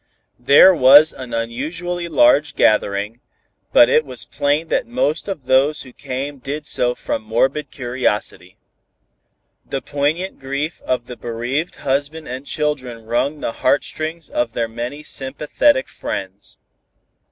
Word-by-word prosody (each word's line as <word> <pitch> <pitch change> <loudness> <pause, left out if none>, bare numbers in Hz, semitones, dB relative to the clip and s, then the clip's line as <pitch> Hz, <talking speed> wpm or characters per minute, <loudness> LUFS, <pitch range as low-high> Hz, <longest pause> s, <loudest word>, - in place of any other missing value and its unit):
There 140 +9 +7
was 145 +1 +7
an 130 -2 -9
unusually 155 +10 -3
large 145 -1 +3
gathering, 105 +1 +1 0.5
but 120 - +7
it 155 - +3
was 125 -5 -7
plain 145 +3 -1
that - - 0
most 235 - -1
of 185 -10 -5
those 135 +4 +2
who 130 -2 -14
came 140 +1 -5
did 145 +4 -5
so 125 0 0
from - - -3
morbid 130 +6 0
curiosity. 120 -5 -3 1.1
The 135 - -4
poignant 150 +8 -2
grief 140 +4 -4
of 125 -2 -1
the 125 0 -9
bereaved 120 +8 -3
husband 145 +3 -2
and 130 +3 -7
children 130 -7 -3
wrung 140 +6 -1
the - - -2
heartstrings 155 +5 -1
of 120 -1 -2
their 115 -2 -1
many 120 +6 -6
sympathetic 150 - 0
friends. - - -7
140 Hz, 130 wpm, -19 LUFS, 120-150 Hz, 1.1 s, There